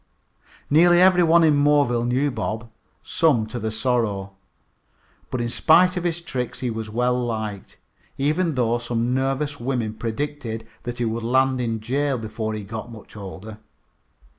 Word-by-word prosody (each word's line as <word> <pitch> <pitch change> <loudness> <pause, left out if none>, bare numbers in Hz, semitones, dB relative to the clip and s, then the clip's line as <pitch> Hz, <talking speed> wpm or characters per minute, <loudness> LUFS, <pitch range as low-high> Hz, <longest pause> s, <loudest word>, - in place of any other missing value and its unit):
Nearly 175 +4 +5
every 185 0 +6
one 170 0 +5
in 155 -2 +5
Moreville 140 -5 +3
knew 135 +4 +1
Bob, 110 -1 -4 0.3
some 140 -10 +2
to 110 +3 -6
their 110 0 -2
sorrow. 110 -4 -1 1.0
But 125 - -2
in 120 - -2
spite 180 +8 +4
of 180 -1 -3
his 170 0 -1
tricks 125 -7 -4
he 125 -2 -1
was 110 -1 -5
well 125 +2 0
liked, 110 -4 -5 0.4
even 155 +3 +1
though 120 -1 +1
some 120 +1 -1
nervous 135 +2 -1
women 120 -3 -2
predicted 115 0 -4 0.2
that 120 0 -4
he 120 - -1
would 115 +1 -2
land 130 +2 +2
in 115 -2 -2
jail 135 +4 0
before 110 -1 -4
he 105 - -5
got 110 +3 -6
to - - -16
be 115 -1 -10
much 110 - -15
older. 105 +2 -9
120 Hz, 165 wpm, -23 LUFS, 110-145 Hz, 1.0 s, every